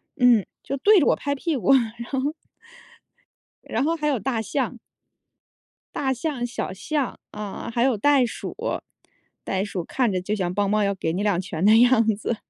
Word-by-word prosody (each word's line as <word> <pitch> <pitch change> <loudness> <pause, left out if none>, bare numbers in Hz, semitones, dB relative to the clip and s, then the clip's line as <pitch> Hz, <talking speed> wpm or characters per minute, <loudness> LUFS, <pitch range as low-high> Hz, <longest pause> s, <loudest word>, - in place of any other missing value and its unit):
嗯， 245 -6 +4 0.2
就 275 - -3
对 405 +7 +5
着 - - +3
我 - - +4
拍 285 0 -2
屁 305 +2 -2
股， 225 +2 +3
然 235 -2 0
后 290 +2 -1 1.3
然 - - -2
后 325 +3 +1
还 300 -1 -1
有 285 -3 +2
大 225 +2 -1
象。 250 +2 -2 1.2
大 265 -2 0
象、 260 -1 -3
小 245 - -4
象， 280 +8 -2
啊， 210 +2 -6
还 235 - +2
有 260 -2 +3
袋 275 +3 +4
鼠。 230 - -6 0.9
袋 190 0 -1
鼠 190 -4 -4
看 250 -5 0
着 185 - 0
就 205 +4 -2
像 180 -3 -2
梆 200 +1 +1
梆 210 +1 +2
要 200 0 +1
给 165 -4 -2
你 190 +4 -1
两 205 -4 +1
拳 180 -2 -4
的 215 +2 +7
样 240 -1 +5
子。 225 +2 -2
235 Hz, 195 characters per minute, -24 LUFS, 200-270 Hz, 1.3 s, 的